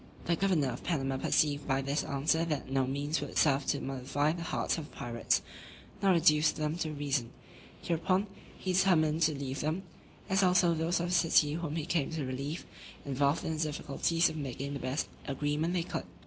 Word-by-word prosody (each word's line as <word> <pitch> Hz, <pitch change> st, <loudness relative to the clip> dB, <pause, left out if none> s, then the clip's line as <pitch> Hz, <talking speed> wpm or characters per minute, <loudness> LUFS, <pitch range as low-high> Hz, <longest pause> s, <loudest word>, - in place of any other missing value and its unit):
The 170 Hz, -, +2 dB
governor 170 Hz, -7 st, +2 dB
of 120 Hz, -, -6 dB
Panama 135 Hz, -5 st, -1 dB
perceived 145 Hz, +1 st, +1 dB
by 135 Hz, 0 st, +1 dB
this 140 Hz, +3 st, 0 dB
answer 150 Hz, +4 st, +1 dB
that 150 Hz, -4 st, -3 dB
no 135 Hz, -1 st, +1 dB
means 145 Hz, +4 st, -1 dB
would -, -, -5 dB
serve 140 Hz, -2 st, +3 dB
to -, -, +1 dB
mollify 135 Hz, +3 st, -1 dB
the 170 Hz, +1 st, -5 dB
hearts 170 Hz, -, -1 dB
of 155 Hz, -, -8 dB
the -, -, -19 dB
pirates, 120 Hz, -1 st, 0 dB, 0.6 s
nor 195 Hz, -2 st, +5 dB
reduce 155 Hz, -2 st, +5 dB
them 155 Hz, 0 st, -2 dB
to 165 Hz, -3 st, -2 dB
reason: 140 Hz, -5 st, -1 dB, 0.5 s
hereupon, 185 Hz, +4 st, +1 dB, 0.3 s
he 185 Hz, -, -2 dB
determined 165 Hz, -4 st, +3 dB
to 155 Hz, -3 st, +3 dB
leave 135 Hz, 0 st, -4 dB
them, 160 Hz, +5 st, -1 dB, 0.4 s
as 195 Hz, 0 st, +2 dB
also 180 Hz, -2 st, +4 dB
those 165 Hz, +2 st, 0 dB
of 175 Hz, +1 st, -1 dB
the -, -, -1 dB
city 160 Hz, -4 st, +4 dB
whom 165 Hz, -2 st, -3 dB
he 160 Hz, -3 st, -2 dB
came 160 Hz, -6 st, 0 dB
to 155 Hz, -4 st, -2 dB
relieve, 140 Hz, +5 st, -4 dB, 0.4 s
involved 140 Hz, +4 st, +1 dB
in 160 Hz, -, -1 dB
the 155 Hz, -, -3 dB
difficulties 155 Hz, +2 st, +1 dB
of 155 Hz, -, -4 dB
making 140 Hz, 0 st, -4 dB
the 140 Hz, -, -4 dB
best 130 Hz, +4 st, -2 dB, 0.2 s
agreement 150 Hz, +4 st, -1 dB
they 175 Hz, -, +1 dB
could. -, -, -4 dB
150 Hz, 195 wpm, -31 LUFS, 140-170 Hz, 0.6 s, nor